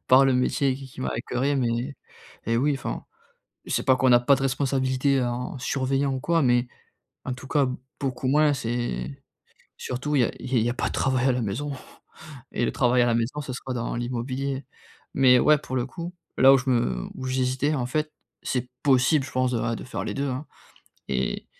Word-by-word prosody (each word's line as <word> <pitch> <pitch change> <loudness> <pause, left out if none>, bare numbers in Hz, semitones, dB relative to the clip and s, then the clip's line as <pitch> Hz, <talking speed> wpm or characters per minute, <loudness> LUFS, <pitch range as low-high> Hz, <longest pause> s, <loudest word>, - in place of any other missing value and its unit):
par 130 +2 +7
le 135 - +4
métier 130 +1 +1
qui 135 0 -9
qui 130 - -12
m'a 65 - -1
écoeuré, 140 +3 -1
mais 125 +2 -1 0.5
et 115 0 +1
oui, 140 +4 +2
enfin - - -5 0.6
c'est - - 0
pas 130 - +5
qu'on 130 0 +3
a 120 - +7
pas 130 +3 +4
de 135 - -4
responsabilité 135 0 +1
en 125 +2 -3
surveillant 135 +1 0
ou - - -3
quoi, 165 +3 +1
mais 120 -1 +3 0.6
en 130 - -2
tout 130 +1 -11
cas 145 -2 +2 0.3
beaucoup 130 -2 -2
moins. 150 +1 +4
C'est 115 - -3 0.5
surtout 140 +4 -3
il 130 - +5
y - - +5
a - - 0
il 130 -1 0
y 115 +2 +2
a - - -3
pas - - -1
de - - -7
travail 130 -1 +1
à - - +4
la 125 -1 -1
maison 125 +9 -3 0.8
et - - -1
le - - 0
travail 125 -1 +3
à - - +3
la 120 - +2
maison 115 +6 -1
ça 135 -3 -5
sera 130 +1 -5
dans 115 -1 -3
l'immobilier. 130 +3 -3 0.5
Mais 130 -2 +6
ouais, 150 +3 +5
pour 130 -3 -5
le 125 0 0
coup, 170 +5 -7 0.3
là 135 +1 +8
où 135 - +6
je 130 +1 -5
me 65 - 0
où 130 - -6
j'hésitai,s 130 +3 0
en 125 -3 -1
fait, 155 +4 -2 0.3
c'est 125 -1 -2
possible 135 +1 +4
je - - -8
pense, 130 0 0
ouais, 115 -1 -1
de - - -8
faire 130 - -5
les - - -3
2, 140 0 -1
hein 130 +4 -3 0.7
et 65 -1 -1
130 Hz, 210 wpm, -25 LUFS, 120-135 Hz, 0.8 s, là